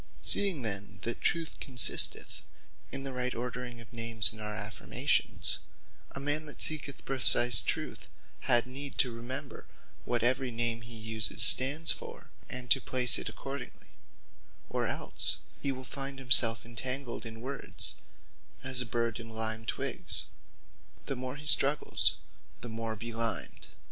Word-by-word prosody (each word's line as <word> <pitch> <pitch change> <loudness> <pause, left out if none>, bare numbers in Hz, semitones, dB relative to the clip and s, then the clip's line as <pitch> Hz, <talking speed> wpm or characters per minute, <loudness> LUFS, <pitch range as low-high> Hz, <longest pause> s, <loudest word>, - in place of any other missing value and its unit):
Seeing 190 -10 +2
then 100 -2 -5
that 120 - -3
Truth 165 -2 -2
consisteth 125 -3 +4 0.5
in 135 - -4
the 135 -1 -5
right 125 0 -4
ordering 125 0 -7
of 115 -2 -14
names 115 -1 +2
in 110 - -10
our 105 0 -6
affirmations, 105 -1 -2 0.5
a - - -8
man 145 +2 -2
that 150 - -8
seeketh 145 -3 0
precise 120 -4 +2
Truth, - - -5 0.4
had 120 0 +5
need 135 +2 -7
to 125 - +2
remember 120 +3 -8 0.4
what 120 -2 -3
every 130 +1 +1
name 115 0 -2
he 115 0 -10
uses 110 -1 +1
stands 145 +5 +8
for; - - -8 0.2
and 125 -1 -5
to 135 - +4
place 125 -1 +6
it - - -5
accordingly; 135 -1 -9 0.8
or - - -2
els - - -1 0.2
he 140 - -2
will 130 -1 -8
find 135 +1 -6
himselfe 120 -4 +5
entangled 125 +2 -5
in 115 -1 -7
words, 135 +3 -3 0.7
as 130 -1 +2
a 125 - -5
bird 115 -1 -3
in 115 0 -10
lime 110 0 -3
twiggs; - - -4 0.8
the 135 - -4
more 130 +1 -6
he 150 +1 -12
struggles, 145 0 +3 0.4
the 120 - -9
more 115 0 -5
belimed. 115 -2 -4
125 Hz, 145 wpm, -29 LUFS, 115-135 Hz, 0.8 s, stands